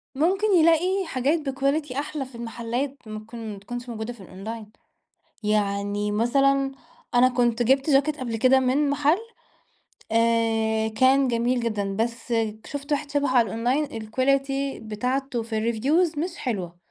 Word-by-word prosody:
ممكن 375 +9 +2
يلاقي 350 +4 +3
حاجات 290 +2 0
بquality 275 +1 -1
أحلى 290 -1 -3
في 255 -2 -14
المحلات، 235 +4 -3
ممكن 215 0 -7
ما 200 - -9
تكونش 245 +4 -7
موجودة 220 +1 -5
في 230 - -15
الأونلاين، 210 +4 -8 0.7
يعني 205 0 0
مثلًا 275 +5 +2 0.4
أنا 250 +1 +6
كنت 240 -2 +1
جِبت 270 +5 +2
جاكيت 290 +2 +3
قبل 240 -4 -3
كده 260 +3 +4
من 275 +3 +2
محل 290 +4 +2 0.9
آآ، 225 -1 +2
كان 260 +4 +3
جميل 240 +1 +1
جدًا 205 -4 -2
بس 235 +2 -2 0.3
شُفت 285 +1 -5
واحد 290 0 -1
شبهه 285 -2 +1
على 235 - +4
الأونلاين 245 +8 0
الquality 275 +4 -1
بتاعته 250 +3 -2
في 220 -1 -3
الreviews 305 +8 +1
مش 340 +3 -3
حلوة، 185 -9 -4
250 Hz, 140 wpm, -25 LUFS, 225-275 Hz, 0.9 s, أنا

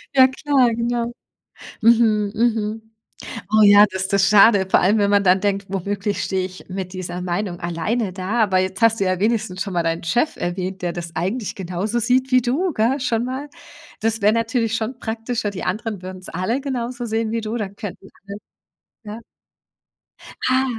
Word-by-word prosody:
Ja 260 -1 +8
klar, 260 -2 +2
genau. 235 +1 -2 0.7
Mhm, 220 -3 +3
mhm. 220 -1 -1 0.6
Oh 215 0 +5
ja, 205 0 +8
das 190 0 -2
das 195 0 +2
schade. 200 -1 +6
Vor - - +5
allem, 200 +5 +3
wenn 200 -1 +2
man 200 0 +4
dann 185 0 +4
denkt: 200 -1 0
„Womöglich 200 +1 -2
stehe 190 -1 -1
ich 185 0 -10
mit 185 0 -5
dieser 180 -1 -5
Meinung 180 0 -3
alleine 185 +6 -2
da.“ 190 +5 -1
Aber 190 -3 +1
jetzt 190 +2 -2
hast 230 0 +4
du - - +2
ja 185 -1 0
wenigstens 205 -3 -1
schon 195 -2 -3
mal 170 -1 0
deinen 165 0 -2
Chef 240 - 0
erwähnt, 185 +2 -4
der 175 -1 -2
das 170 -1 -7
eigentlich 195 +7 -2
genauso 190 +5 -2
sieht 255 +3 +1
wie 255 0 +5
du, 295 +9 0
gell, 240 +5 +1
schon 235 -3 0
mal. 265 +3 -5 0.5
Das 225 0 0
wäre 210 +2 +4
natürlich 230 -1 0
schon 225 +3 -3
praktischer, 225 -2 -3
die 185 - -6
anderen 210 +1 -3
würden's 185 0 -8
alle 220 +8 -1
genauso 250 -3 -4
sehen 225 0 -1
wie 230 0 -1
du, 220 +1 -4
dann 200 -3 -5
könnten 200 -2 -8 1.0
alle 210 0 -6
ja. - - -8 1.3
Ah. 260 +1 +3
210 Hz, 180 wpm, -21 LUFS, 185-235 Hz, 1.3 s, Ja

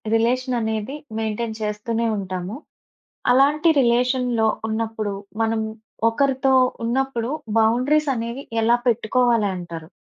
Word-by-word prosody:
Relation 250 +2 +1
అనేది 220 +4 -2 0.2
maintain 220 0 -2
చేస్తూనే 225 +2 -1
ఉంటాము. 185 +1 -4 0.8
అలాంటి 295 +5 +4
రిలేషన్‌లో 245 -1 +2 0.2
ఉన్నప్పుడు, 220 -2 -2 0.3
మనం 225 0 0 0.5
ఒకరితో 265 +2 +1 0.3
ఉన్నప్పుడు 245 -1 -1 0.3
బౌండరీస్ 260 +7 +2
అనేవి 235 +3 -4 0.2
ఎలా 235 +2 +4
పెట్టుకోవాలంటారు? 210 -8 0
230 Hz, 90 wpm, -22 LUFS, 220-255 Hz, 0.8 s, అలాంటి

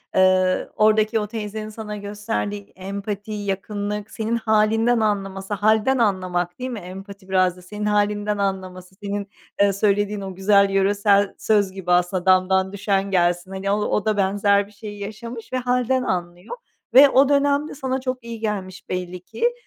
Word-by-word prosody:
Eee, 185 0 +3
oradaki 215 +1 +3
o 210 - -3
teyzenin 215 0 -5
sana 210 -1 -7
gösterdiği 205 0 -4
empati, 200 +2 -5
yakınlık, 205 +1 -4
senin 225 +1 -2
hâlinden 225 +1 +2
anlaması... 195 -2 -2
Hâlden 220 +5 +2
anlamak, 185 -5 0
değil 255 +1 -3
mi? 235 -4 -5
Empati 195 +1 -10
biraz 185 -1 +2
da 180 - -13
senin 210 +3 -6
hâlinden 210 0 +1
anlaması 185 -2 -4
senin, 200 0 -3 0.3
eee, 200 -1 +4
söylediğin 205 +1 +1
o 190 -2 -6
güzel 200 +1 +4
yöresel 200 +1 +2
söz 205 -3 +2
gibi 185 -2 -4
aslında 180 +1 +2
damdan 190 +1 +3
düşen 200 -1 -1
gelsin. 175 0 +1
Hani, 195 +1 -2
o - - +3
o 210 - 0
da 215 -1 +1
benzer 200 +1 +2
bir 210 - -19
şeyi 205 0 -9
yaşamış 230 +4 -8
ve 255 - +1
hâlden 250 +1 +1
anlıyor 180 - -4 0.4
ve 275 +2 +9
o 270 +1 +4
dönemde 285 +1 +1
sana 265 -1 -2
çok 255 -2 -4
iyi 230 -1 -7
gelmiş 200 -4 -4
belli 180 0 -4
ki. 470 - -1
205 Hz, 160 wpm, -22 LUFS, 190-220 Hz, 0.4 s, ve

